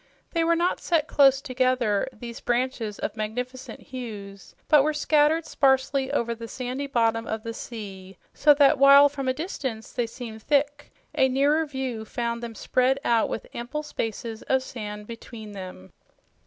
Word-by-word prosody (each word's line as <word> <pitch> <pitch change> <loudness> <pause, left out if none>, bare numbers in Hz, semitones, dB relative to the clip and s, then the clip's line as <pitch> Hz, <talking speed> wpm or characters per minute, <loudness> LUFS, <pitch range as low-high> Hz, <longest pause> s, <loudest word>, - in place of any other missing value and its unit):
They 335 -1 +1
were 335 +1 +3
not 345 +2 +1
set 320 -3 +1
close 275 -1 +5
together, 255 -5 +1
these 235 +1 -9
branches 240 -3 -1
of - - -4
magnificent 250 +4 -5
hues, 210 -6 -9
but 300 -2 +6
were 305 +1 0
scattered 305 +2 +3
sparsely 270 -2 +2
over 235 -4 0
the 230 0 -8
sandy 255 +4 -4
bottom 230 -3 +1
of 220 0 -3
the 230 - -5
sea 195 -5 -8 0.2
so 295 0 +5
that 280 -2 +5
while 280 +1 +8
from 275 -2 -5
a - - +3
distance 265 - -5
they 240 -2 -1
seemed 225 -2 -8
thick, 290 +2 0 0.2
a 265 - +3
nearer 290 +4 +2
view 265 -5 -4
found 235 +1 -3
them 235 -1 -6
spread 255 +4 +1
out 230 -2 +3
with - - -4
ample 255 +6 -4
spaces 225 -4 -4
of 265 0 +3
sand 210 -5 -7
between 225 -1 -9
them. 185 - -9
255 Hz, 165 wpm, -25 LUFS, 225-280 Hz, 0.2 s, while